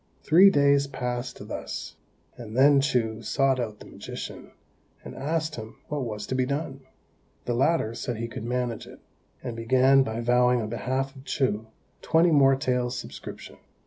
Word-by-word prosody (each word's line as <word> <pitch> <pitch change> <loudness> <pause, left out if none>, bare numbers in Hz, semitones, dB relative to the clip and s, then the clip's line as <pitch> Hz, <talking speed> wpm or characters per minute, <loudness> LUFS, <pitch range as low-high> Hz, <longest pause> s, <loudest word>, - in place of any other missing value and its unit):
Three 180 +6 +7
days 140 -4 +3
passed 125 -2 -5
thus, - - -6 0.4
and 115 -1 -8
then 140 +1 +6
Chou 115 -5 0
sought 135 +2 +1
out 110 -3 -3
the - - -13
magician, - - -8 0.6
and - - -8
asked 155 +2 -2
him 110 0 -8
what 150 -2 -2
was 105 -2 -5
to - - -4
be 130 0 +1
done. 140 -1 -3 0.7
The 120 - -1
latter 130 -2 +1
said 120 0 -4
he 115 +1 -3
could 115 - -7
manage 120 -1 -2
it, - - -13 0.4
and 120 -3 -5
began 130 +4 +4
by 110 -3 -2
vowing 125 +1 +3
on 110 -2 -3
behalf 130 +4 -2
of 135 - -12
Chou 110 -7 -1 0.3
twenty 165 +1 +3
more 135 -3 +5
taels' 125 -2 -1
subscription. - - -9
130 Hz, 165 wpm, -26 LUFS, 115-140 Hz, 0.7 s, Three